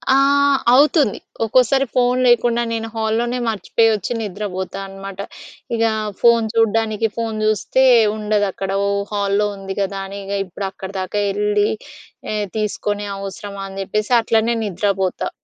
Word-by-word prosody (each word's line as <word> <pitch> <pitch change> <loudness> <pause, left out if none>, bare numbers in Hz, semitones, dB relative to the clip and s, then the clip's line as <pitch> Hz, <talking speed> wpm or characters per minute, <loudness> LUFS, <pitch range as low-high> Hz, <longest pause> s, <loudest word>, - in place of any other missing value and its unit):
ఆహ్, 280 0 +4 0.2
అవుతుంది. 285 - +4 0.3
ఒక్కోసారి 255 +4 +3
ఫోన్ 250 0 +3
లేకుండా 240 0 +3
నేను 225 0 -2
హాల్‌ 220 0 0
లోనే 240 +1 -1
మర్చిపోయి 225 +1 +2
వచ్చి 210 +3 -2
నిద్రపోతా 195 -2 -4
అనమాట. 195 0 -9 0.6
ఇగా 225 0 +2 0.3
ఫోన్ 235 -1 +5
చూడ్డానికి 225 -1 +1
ఫోన్ 225 -2 -2
చూస్తే, 215 +5 +2 0.3
ఉండదు 210 -1 +1
అక్కడ. 195 +1 -5 0.2
ఓహ్! 200 0 -1
హాల్‌లో 200 0 +1
ఉంది 195 0 -6
కదా! 195 0 -2
అని 200 +1 -8
ఇగ 200 - -4
ఇప్పుడు 195 +2 -5
అక్కడి 190 0 -9
దాకా 185 +3 -2
వెళ్ళి 205 +1 +1 0.7
ఆహ్, 210 -1 -1
తీసుకొని 205 -1 -2
అవసరమా 200 0 -7
అని 195 0 -8
చెప్పేసి 210 +4 -2
అట్లనే 225 +1 +1
నిద్రపోతా. 190 -1 -1
210 Hz, 140 wpm, -19 LUFS, 195-230 Hz, 0.7 s, ఫోన్